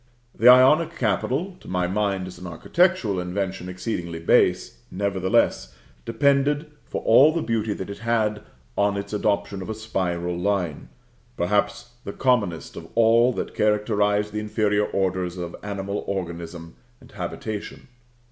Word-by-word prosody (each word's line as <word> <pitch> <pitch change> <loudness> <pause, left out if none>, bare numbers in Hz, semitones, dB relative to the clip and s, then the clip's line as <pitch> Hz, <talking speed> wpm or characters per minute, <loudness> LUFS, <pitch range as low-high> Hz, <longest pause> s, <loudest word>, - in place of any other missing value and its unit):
The 115 - +2
Ionic 130 +6 +6
capital 135 - -1
(to - - -16
my 90 -1 0
mind, 95 0 -1
as 95 - -10
an 90 - -8
architectural 130 - +1
invention, 90 0 -3
exceedingly 90 -2 -4
base) 85 - +2
nevertheless 95 -9 0 0.3
depended 140 +5 +1 0.2
for - - -4
all 135 +7 +6
the 165 0 -2
beauty 110 -2 -1
that 95 - -6
it 100 0 -8
had 110 -2 0 0.3
on 100 0 +1
its 100 +1 -6
adoption 100 -1 -1
of 95 - -7
a 110 - -3
spiral 90 -5 -2
line, 90 -5 -2 0.5
perhaps 105 +6 0
the 100 - -6
commonest 100 - 0
of - - -9
all 115 +2 +5
that - - -4
characterise 105 0 +1
the 105 - -3
inferior 105 -1 0
orders 95 -2 -1
of 85 -1 -5
animal 100 0 -4
organism 85 -3 -5 0.2
and - - -18
habitation. 105 +2 -6
100 Hz, 140 wpm, -24 LUFS, 90-115 Hz, 0.5 s, Ionic